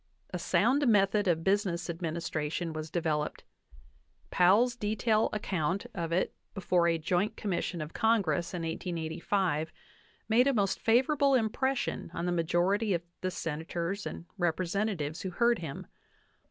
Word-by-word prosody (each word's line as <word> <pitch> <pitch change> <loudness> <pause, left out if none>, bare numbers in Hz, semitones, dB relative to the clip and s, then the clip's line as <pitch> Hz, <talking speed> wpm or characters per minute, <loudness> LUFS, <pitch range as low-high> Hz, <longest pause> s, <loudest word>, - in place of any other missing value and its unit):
A - - -3
sound 275 +3 +2
method 205 -1 +3
of 165 -2 +2
business 190 -3 +1
administration 165 -1 -3
was 155 0 -5
developed. 155 -2 -1 0.9
Powell's 210 +7 +4
detailed 215 0 +1
account 190 -3 -1
of 170 -4 -3
it 175 +2 +1 0.2
before 180 -3 +2
a 165 -1 +2
Joint 180 +7 0
Commission 180 -3 -2
of 150 - -10
Congress 185 -8 +1
in 170 - -3
1885 165 0 -1 0.6
made 235 +4 +4
a 275 - +2
most 200 -3 +1
favorable 270 +4 +3
impression 255 +3 0
on 170 - -2
the 180 - 0
majority 175 +5 +1
of 170 - -3 0.2
the 185 - 0
Senators 170 +4 -3
and 170 - -7
Representatives 175 -2 -1
who 190 - -3
heard 235 +6 +2
him. 150 -5 -6
180 Hz, 135 wpm, -30 LUFS, 165-215 Hz, 0.9 s, Powell's